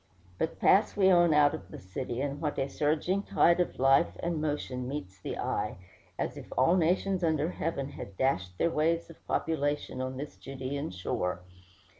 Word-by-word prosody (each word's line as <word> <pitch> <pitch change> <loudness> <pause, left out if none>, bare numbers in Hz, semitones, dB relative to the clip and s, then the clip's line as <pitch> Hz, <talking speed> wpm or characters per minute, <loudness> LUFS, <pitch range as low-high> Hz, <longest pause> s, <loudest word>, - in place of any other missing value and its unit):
But 160 - -1
pass 205 +2 +4
we 190 -1 +5
on 175 -2 +5
out 150 -1 +5
of 95 - -7
the - - -8
city, 120 +7 -5
and 145 +1 -3
what 150 -2 -2
a 135 - 0
surging 155 +7 0
tide 170 -3 +3
of 175 - 0
life 135 +5 +4
and 170 -2 -1
motion 135 -4 -2
meets 100 -10 -6
the - - -4
eye, - - -2 0.4
as - - -3
if - - -10
all 130 +8 +5
nations 185 +2 +1
under 160 0 +1
heaven 150 -6 -3
had 100 -8 -9
dashed 90 -9 0
their 170 - +2
waves 165 +2 +1
of 165 - -18
population 145 -4 -1
on 130 0 -4
this 145 +2 -7
Judæan 135 +2 -5
shore! 90 0 -2
145 Hz, 180 wpm, -30 LUFS, 130-165 Hz, 0.4 s, we